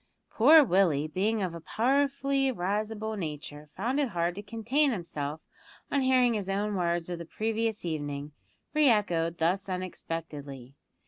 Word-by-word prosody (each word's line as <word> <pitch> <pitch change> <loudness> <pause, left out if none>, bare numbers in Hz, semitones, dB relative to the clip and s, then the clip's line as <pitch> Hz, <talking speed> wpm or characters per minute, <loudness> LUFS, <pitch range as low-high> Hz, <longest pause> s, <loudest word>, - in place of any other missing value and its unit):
Poor 300 +7 +7
Willie, 175 - +2
being 205 +6 0
of 180 -3 -2
a 170 - -8
powerfully 275 - +1
risible 215 +2 -2
nature, 150 -4 -6
found 235 - -2
it 280 -4 +1
hard 175 -2 -1
to 200 - -7
contain 230 +7 +1
himself 155 - -4 0.5
on 280 - +2
hearing 255 -2 +4
his 200 -3 -3
own 205 +2 -1
words 170 -2 0
of 175 - -4
the - - -5
previous 220 +2 -2
evening 145 -3 -4 0.4
re 300 -2 +5
echoed 170 -7 +1
thus 180 +4 0
unexpectedly. 155 -7 -6
195 Hz, 145 wpm, -29 LUFS, 165-230 Hz, 0.5 s, Poor